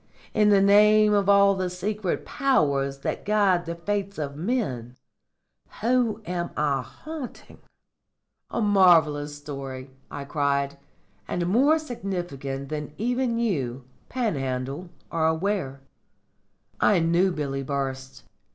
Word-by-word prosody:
In 210 -1 +4
the 200 -1 +5
name 210 +1 +6
of 200 -1 +2
all 200 0 +6
the 185 -1 -2
secret 190 +2 -3
Powers 140 - +1
that - - -3
guide 200 -5 +2
the 170 - -3
fates 200 +3 -3
of 140 -2 -4
men 150 - -2 0.9
whom 230 -2 +1
am 175 -1 -3
I 145 -3 +1
haunting?'" 305 - -9 0.9
"A - - -2
marvellous 160 -8 +4
story," 135 -2 -7 0.2
I 140 - -6
cried; 140 -1 -1 0.5
"and 175 - -2
more 265 - +4
significant 175 - -5
than 150 -1 -5
even 245 +1 0
you, 135 - -1 0.3
Panhandle, 140 - -2 0.2
are 160 -1 +1
aware. 160 -5 -1 1.0
I 205 - +4
knew 170 +3 +2
Billy 140 -4 -3
Burst. 135 -1 -4
175 Hz, 115 wpm, -25 LUFS, 140-210 Hz, 1.0 s, name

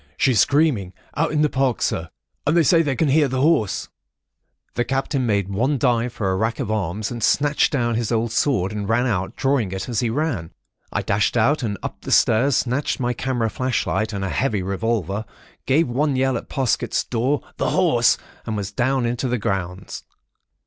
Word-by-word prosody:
'She's 125 -6 +3
screaming.... 140 - +2 0.2
out 160 +1 +1
in 150 0 +2
the - - +4
Park, 130 -4 0
Sir! 80 0 -1 0.4
And 155 +4 +3
they 170 - +5
say 165 +3 +5
they 145 -4 0
can 155 +2 +1
hear 150 +1 +4
the 130 0 -2
Horse——' 145 - +1 0.9
"The 120 - 0
Captain 135 +1 -1
made 100 -3 +1
one 125 +9 0
dive 120 -2 +1
for 95 -5 -1
a - - 0
rack 110 +6 -1
of 120 -6 -2
arms, 105 0 -2
and 120 -1 -5
snatched 145 +4 +2
down 120 -4 0
his 115 0 -1
old 115 0 0
sword, 115 -7 +1
and 105 -1 -4
ran 115 +2 +2
out, 95 -6 -1
drawing 135 -8 0
it 95 0 -4
as 115 -3 -1
he 120 - 0
ran. 120 - -2 0.4
I - - -1
dashed 100 +4 +1
out 135 +7 +3
and 105 -4 -2
up - - -6
the - - -6
stairs, 125 +5 +4
snatched 130 +4 -1
my 125 -1 0
camera 120 -3 -1
flashlight 120 -3 -1
and 100 -2 -3
a - - -2
heavy 110 -6 0
revolver, 100 0 -1 0.4
gave 150 +4 +3
one 140 +3 0
yell 130 0 +1
at - - -5
Parsket's 130 -4 0
door:—'The 130 +5 -1
Horse!' - - +3 0.3
and 110 - -2
was 100 -1 -4
down 130 +4 0
and 120 - +1
into 125 +2 -2
the 125 0 0
grounds. 95 -3 -4
120 Hz, 195 wpm, -22 LUFS, 105-135 Hz, 0.9 s, they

